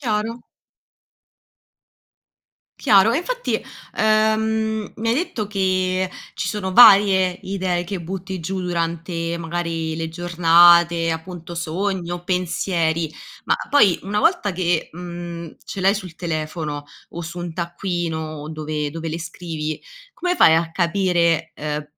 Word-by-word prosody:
Chiaro. 225 -1 -2 2.4
Chiaro, 215 -4 +5
e 235 - +1
infatti, - - -2 0.4
ehm, 220 0 +1
mi 225 +1 -3
hai 230 - +3
detto 245 - -2
che 185 -2 0 0.3
ci - - -3
sono 195 -3 -3
varie 195 -4 +7
idee 185 -2 -1
che 190 +1 -5
butti 190 +2 -5
giù 185 +3 -3
durante, 170 -1 -2
magari, 165 -1 -3
le 165 0 -3
giornate, 170 0 +5
appunto, 170 +1 -6
sogni 175 +1 -2
o 175 0 -5
pensieri. 170 -3 -1 0.3
Ma - - +3
poi 210 -11 +5
una 205 +2 -1
volta 325 - +2
che, 175 -2 0
mhmm, 170 -1 -7
ce 195 - -6
l'hai 190 +1 +4
sul 185 -5 -8
telefono 155 -3 -4 0.2
o 170 - -7
su 170 +2 -6
un 175 -1 -5
taccuino 165 -3 -4
dove 155 -1 -3
dove 165 0 -5
le 160 +1 -3
scrivi, 160 -2 -5 0.3
come 360 0 -1
fai 160 - +7
a 165 0 +1
capire, 170 -2 +1
ehm, 150 0 -3
175 Hz, 130 wpm, -21 LUFS, 165-195 Hz, 2.4 s, varie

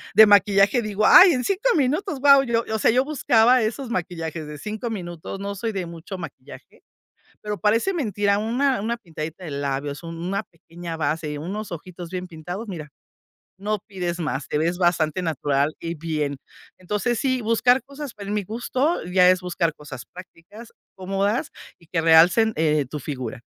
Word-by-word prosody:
de 220 +2 +10
maquillaje, 200 +2 +4
digo: 215 0 -1
"Ay, 370 0 +9
en 250 -2 -1
5 410 - +1
minutos, 300 +4 0
guau", 280 -1 +7 0.3
o 220 - 0
sea, - - +4
yo 255 +3 +3
buscaba 250 -4 +3
esos 235 +4 -3
maquillajes 165 -5 -4
de 150 - -8
5 215 - -5
minutos, 175 -2 -6
no 200 0 -4
soy 225 +3 -3
de 185 -3 -3
mucho 170 +3 -8
maquillaje, 145 -5 -11 0.6
pero 210 -1 -4
parece 230 - +2
mentira, 205 - 0
una 250 +4 0
una 235 +2 -1
pintadita 165 -3 -7
de 160 - -6
labios, 140 +1 -3
un 165 0 -7
una 185 +4 -2
pequeña 170 0 -9
base, 150 -1 -2
unos 195 +6 -5
ojitos 175 +1 -8
bien 185 0 -4
pintados. 175 +6 -7
Mira, 155 -6 -7 0.7
no 210 +2 -2
pides 180 -4 -4
más, 150 -4 -3
te - - -1
ves 170 +3 0
bastante 175 -1 +1
natural 145 -2 0
y 170 0 -4
bien. 150 -3 -3 0.4
Entonces, 210 +5 -1
sí, 255 -2 0
buscar 230 +3 +3
cosas, 280 -1 -8
pero 200 -2 -9
en - - -2
mi 210 -1 -1
gusto 255 - -1
ya 180 0 +5
es 185 0 +4
buscar 170 -3 -1
cosas 140 -4 -9
prácticas, 185 +5 -13 0.2
cómodas 195 +7 -1 0.3
y 170 - -22
que 165 -1 -1
realcen, 170 +8 +5
eh, 150 -3 +1
tu 150 - -5
figura. 130 -6 -6
185 Hz, 175 wpm, -23 LUFS, 165-225 Hz, 0.7 s, de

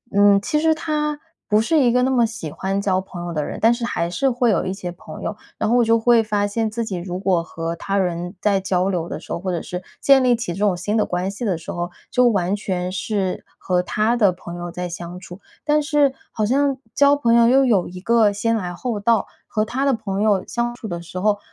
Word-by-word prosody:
嗯， 200 0 +6
其 300 +7 0
实 320 0 +4
他 300 -1 -2 0.3
不 210 +1 +4
是 310 +9 +2
一 240 -2 +4
个 250 +1 +3
那 260 - +2
么 240 -3 +4
喜 220 -9 -6
欢 195 +1 -2
交 190 -2 +1
朋 175 -2 -8
友 175 - -4
的 150 -2 -1
人， - - -5
但 230 +2 +5
是 235 - -5
还 170 -7 -1
是 270 +9 +1
会 245 -1 +1
有 205 - +1
一 185 - -2
些 185 -3 -6
朋 180 - -11
友。 - - -3 0.2
然 - - 0
后 240 - +3
我 245 - +5
就 230 0 +3
会 230 0 +4
发 205 -1 0
现 220 +1 -1
自 230 0 -2
己 195 - -4
如 180 +1 -4
果 185 -4 +1
和 165 0 -4
他 195 +4 -2
人 175 -1 -1
在 200 -1 +2
交 185 -1 0
流 175 -3 -2
的 - - -5
时 - - -7
候， 170 - -4
或 185 -1 -2
者 170 - -2
是 180 +1 -6 0.2
建 275 -2 +5
立 245 -2 +4
起 200 -7 -4
这 190 - -7
种 205 -4 +2
新 205 +5 -2
的 215 - +2
关 180 +2 -2
系 205 +5 -7
的 190 -7 0
时 165 - -11
候， 175 0 -3 0.2
就 250 -1 +4
完 195 -2 +1
全 185 -3 -3
是 190 -1 -2
和 180 -1 0
他 215 +5 0
的 205 -6 +4
朋 175 -1 -9
友 175 0 -5
在 180 +1 -4
相 175 +1 -7
处。 180 0 -11 0.3
但 300 0 +3
是 290 -3 +2 0.2
好 215 - -1
像 275 +3 +1 0.2
交 285 +1 +5
朋 235 -5 +2
友 235 0 +6
又 265 +2 +5
有 205 -8 +2
一 180 +1 -9
个 220 +1 +3
先 230 +3 0
来 180 -5 -3
后 230 +1 -3
到， 230 +2 +2 0.2
和 215 0 0
他 260 +5 -2
的 275 - +3
朋 200 -2 -3
友 205 -3 +2
相 240 0 -2
处 225 - -8
的 170 -2 -5
时 180 +2 -7
候， 205 +1 +1
205 Hz, 275 characters per minute, -21 LUFS, 180-235 Hz, 0.3 s, 嗯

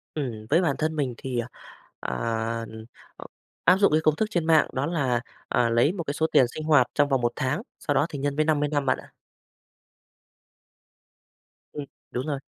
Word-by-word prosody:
Ừm, 115 -7 -4
với 165 +5 +4
bản 145 -6 +1
thân 155 0 -1
mình 135 -5 -1
thì, 130 -3 -3 0.6
ờ, - - -4 0.6
ừm, 110 0 -10 0.3
ờ, - - -10 0.4
áp 185 +2 +6
dụng 200 -4 +4
cái 155 +1 +3
công 155 -1 +3
thức 220 - 0
trên 170 -3 0
mạng 160 -3 +5
đó 135 +2 -1
là, 135 -8 0 0.3
ờ, 115 - +2
lấy 120 +7 +3
một 175 -4 -4
cái 140 - -3
số 160 +2 +1
tiền 130 - +6
sinh 155 - -4
hoạt 145 -6 +4
trong 145 -1 +2
vòng 135 -2 +2
1 120 0 +1
tháng, 150 +6 -1 0.2
sau 145 - -1
đó 145 - +3
thì 145 - -6
nhân 140 0 -1
với 155 0 +2
50 150 -2 +1
năm 145 -2 0
bạn - - +2
ạ. - - -13 2.6
Ừm, 145 -1 -5 0.3
đúng 130 +5 -3
rồi. 140 -2 -2
145 Hz, 200 wpm, -26 LUFS, 130-155 Hz, 2.6 s, áp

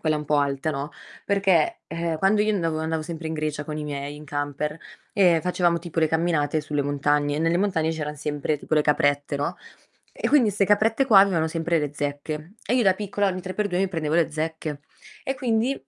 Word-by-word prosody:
quella 155 -1 +1
un 150 - -4
po' 150 - +2
alta, 140 +1 0
no, 140 +1 -4 0.3
perché, 195 -5 +2
ehm, 165 0 -3
quando 200 +4 +3
io 215 0 +1
andavo 165 -5 -1
andavo 160 0 -2
sempre 160 0 -6
in 160 - -3
Grecia 150 -1 -3
con 150 +1 -5
i 150 - -4
miei, 145 0 -5
in 150 - -11
camper, 145 +1 -3 0.4
e 180 -6 +4
facevamo 175 -1 +1
tipo 170 -1 -3
le 160 - +3
camminate 160 -2 +1
sulle 150 -1 -2
montagne, 145 +1 +1
e - - -1
nelle 165 +2 +2
montagne 170 -5 +1
c'eran 150 -2 -4
sempre 150 +1 -2
tipo 155 - -2
le 150 - +4
caprette, 145 -1 +1
no, 145 +5 -2 0.6
e - - -2
quindi 260 -8 +4
'ste 200 0 +1
caprette 215 +6 +3
qua 215 -6 +7
avevano 175 -5 +2
sempre 165 +1 0
le 145 -1 -2
zecche, 150 +4 -4
e 240 - +1
io 255 - +3
da 190 -3 +4
piccola 205 0 -1
ogni 185 -1 -3
3 185 - -5
per 210 - 0
2 180 -2 -1
mi 195 0 +1
prendevo 160 -4 -2
le 170 -1 +3
zecche, 155 -1 -4 0.4
e 270 - -2
quindi 240 -1 +1
160 Hz, 220 wpm, -24 LUFS, 150-185 Hz, 0.6 s, qua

